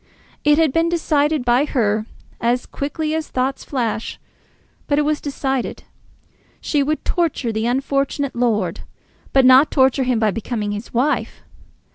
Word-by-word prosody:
It 295 0 +4
had 315 -4 +3
been 330 +1 +2
decided 305 -4 +1
by 245 +3 +3
her 215 -6 0 0.3
as 240 +1 0
quickly 305 +2 -3
as 315 -1 -2
thoughts 260 +1 -2
flash, 235 -5 -3 0.7
but 285 - +1
it 300 - +3
was 300 0 0
decided. 270 -3 -3 0.8
She 295 - 0
would 305 +2 -1
torture 320 -8 0
the 220 +1 -1
unfortunate 275 +2 -1
lord, 215 -8 0 0.5
but 270 -1 +4
not 260 +3 +7
torture 265 -1 +3
him 250 -2 +1
by 220 -2 +2
becoming 215 0 -3
his 205 +3 -6
wife. 260 +6 -1
265 Hz, 145 wpm, -20 LUFS, 235-295 Hz, 0.8 s, not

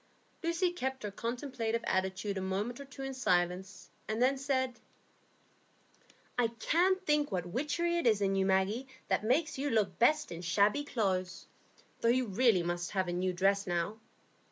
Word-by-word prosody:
Lucy 335 +2 +1
kept 265 -7 -3
her 210 - -3
contemplative 230 0 -3
attitude 190 +2 -1
a 190 - -2
moment 200 +6 -2
or 280 - -7
two 275 0 -9
in 270 0 -4
silence, 185 -5 -1 0.2
and 215 +1 -2
then 260 +3 +4
said,— 260 -2 -1 1.6
"I 240 - +4
can't 355 - +1
think 295 -2 +2
what 180 -3 -1
witchery 300 - -1
it 295 - +1
is 215 -3 +4
in 195 -1 +1
you, 190 0 +2
Maggie, 195 +7 +1 0.2
that - - +1
makes 275 +6 +1
you 290 +1 0
look 205 -7 +1
best 300 +5 +3
in 170 0 -6
shabby 200 +10 +2
clothes; 185 -7 -1 0.5
though - - 0
you 255 +1 +3
really 215 -3 +3
must 175 0 -2
have 190 -2 0
a - - -2
new 185 +1 0
dress 195 +2 +1
now. 175 +5 -1
225 Hz, 170 wpm, -32 LUFS, 190-270 Hz, 1.6 s, then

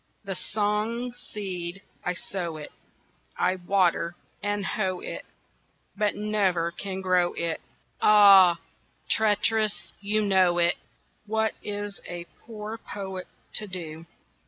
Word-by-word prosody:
The 195 -1 -3
song 215 +5 -1
seed, 195 -5 -6 0.2
I 180 -1 -1
sow 170 -3 -4
it, 150 - -8 0.7
I 185 - +2
water 175 -2 +2 0.3
and 205 -1 -1
hoe 185 -4 -1
it, - - -6 0.7
But 210 0 +1
never 195 -5 +1
can 190 +2 -5
grow 180 -2 +3
it. 170 -1 -2 0.4
Ah, 195 -4 +8 0.5
traitress, 215 0 +2
you 210 +1 +1
know 185 -3 +4
it! 175 0 +3 0.5
What 220 +1 +1
is 205 -1 -5
a 175 -1 -5 0.2
poor 220 0 -6
poet 190 -4 -6 0.3
to 210 - -1
do? 165 -3 -7
195 Hz, 115 wpm, -27 LUFS, 175-210 Hz, 0.7 s, Ah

